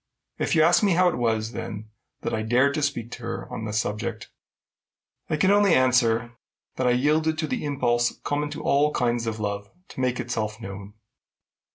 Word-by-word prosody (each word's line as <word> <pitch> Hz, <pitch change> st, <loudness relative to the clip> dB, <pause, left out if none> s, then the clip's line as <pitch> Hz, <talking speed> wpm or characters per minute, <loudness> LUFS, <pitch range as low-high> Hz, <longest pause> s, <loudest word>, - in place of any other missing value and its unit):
If -, -, 0 dB
you 155 Hz, -, +5 dB
ask 170 Hz, +2 st, +5 dB
me 200 Hz, -3 st, +3 dB
how 180 Hz, +1 st, +4 dB
it -, -, -3 dB
was, 110 Hz, -2 st, 0 dB
then, 110 Hz, -2 st, -7 dB, 0.3 s
that -, -, -3 dB
I 110 Hz, -, 0 dB
dared 125 Hz, +6 st, +3 dB
to 155 Hz, -, -1 dB
speak 125 Hz, -5 st, -2 dB
to 125 Hz, -, -8 dB
her 115 Hz, -, -5 dB
on 110 Hz, -, -4 dB
the 105 Hz, -, -4 dB
subject, 110 Hz, +2 st, -3 dB, 1.0 s
I 155 Hz, -, 0 dB
can 190 Hz, +6 st, +3 dB
only 205 Hz, -3 st, +5 dB
answer 120 Hz, -2 st, +2 dB, 0.4 s
that 130 Hz, -, +1 dB
I -, -, +4 dB
yielded 155 Hz, +5 st, +2 dB
to 160 Hz, -, -1 dB
the -, -, -3 dB
impulse 120 Hz, -5 st, 0 dB
common 145 Hz, +1 st, -1 dB
to -, -, -7 dB
all 145 Hz, +2 st, +3 dB
kinds 120 Hz, -1 st, 0 dB
of 110 Hz, -1 st, -3 dB
love 100 Hz, -1 st, -3 dB, 0.2 s
to -, -, -10 dB
make 125 Hz, -1 st, 0 dB
itself 110 Hz, -3 st, -3 dB
known. 100 Hz, -1 st, -8 dB
120 Hz, 195 wpm, -25 LUFS, 110-145 Hz, 1.0 s, you